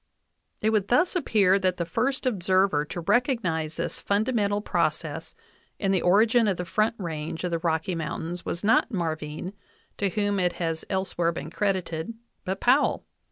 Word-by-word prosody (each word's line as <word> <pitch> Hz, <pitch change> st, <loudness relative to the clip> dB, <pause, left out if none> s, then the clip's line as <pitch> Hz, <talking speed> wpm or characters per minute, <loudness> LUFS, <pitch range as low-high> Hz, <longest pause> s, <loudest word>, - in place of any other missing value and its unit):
It 220 Hz, -, +2 dB
would 210 Hz, -3 st, +1 dB
thus 350 Hz, +11 st, +3 dB
appear 200 Hz, -, +3 dB
that 185 Hz, -1 st, 0 dB
the 170 Hz, -, -1 dB
first 250 Hz, +11 st, -1 dB
observer 190 Hz, -8 st, +2 dB
to 175 Hz, +3 st, -5 dB
recognize 170 Hz, -, 0 dB
this -, -, -3 dB
fundamental 205 Hz, -1 st, +1 dB
process 210 Hz, -, -2 dB, 0.4 s
in 195 Hz, -2 st, 0 dB
the 190 Hz, -3 st, +2 dB
origin 220 Hz, +5 st, +4 dB
of 195 Hz, -3 st, +1 dB
the 180 Hz, -, -3 dB
Front 215 Hz, +6 st, +1 dB
Range 160 Hz, -3 st, -4 dB
of 180 Hz, -, -1 dB
the 165 Hz, -, 0 dB
Rocky 160 Hz, +1 st, 0 dB
Mountains 165 Hz, +2 st, -4 dB
was 170 Hz, -, -4 dB
not 220 Hz, +2 st, +4 dB
Marvine, 160 Hz, -3 st, -3 dB, 0.4 s
to 200 Hz, -, 0 dB
whom 205 Hz, +1 st, 0 dB
it 180 Hz, -1 st, +1 dB
has 165 Hz, -2 st, -3 dB
elsewhere 185 Hz, -3 st, 0 dB
been 165 Hz, -, -6 dB
credited, 185 Hz, -1 st, -2 dB, 0.3 s
but 190 Hz, +1 st, -2 dB
Powell. 265 Hz, +4 st, +3 dB
190 Hz, 160 wpm, -26 LUFS, 170-215 Hz, 0.4 s, origin